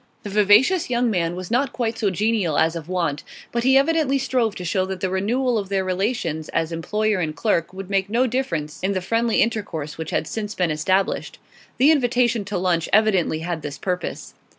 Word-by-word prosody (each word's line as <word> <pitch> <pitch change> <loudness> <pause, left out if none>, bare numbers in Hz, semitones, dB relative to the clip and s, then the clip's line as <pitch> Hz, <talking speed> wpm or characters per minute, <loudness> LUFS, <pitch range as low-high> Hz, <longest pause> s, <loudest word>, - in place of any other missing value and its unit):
The 205 - -6
vivacious 210 - +4
young 240 -1 +1
man 175 -3 0
was 185 +2 -7
not 250 +2 +1
quite 230 -2 -2
so 205 - +2
genial 200 -4 0
as 160 +1 +2
of 165 0 -7
wont, 170 -6 -1 0.3
but 235 0 -1
he 265 +1 +5
evidently 285 -1 +2
strove 245 -5 0
to 180 - -6
show 185 +2 +1
that 190 -1 -5
the 185 0 -2
renewal 230 +5 0
of 195 -2 -6
their 195 -1 0
relations 185 -5 -2
as 165 0 -1
employer 210 +5 -1
and 155 -3 -2
clerk 170 -6 0
would 190 0 -8
make 195 0 +1
no 240 +4 +2
difference 170 - -2
in 190 +2 0
the 190 - 0
friendly 230 +4 +2
intercourse 175 -10 -4
which 160 -1 -4
had - - -1
since 210 +4 -5
been 180 -3 +1
established; 185 +6 0 0.4
the 280 +5 +6
invitation 245 -5 +2
to 205 -1 -3
lunch 175 -2 0
evidently 195 -7 +2
had 170 -1 -3
this 145 -1 -6
purpose. 180 +2 -4
195 Hz, 200 wpm, -22 LUFS, 175-235 Hz, 0.4 s, the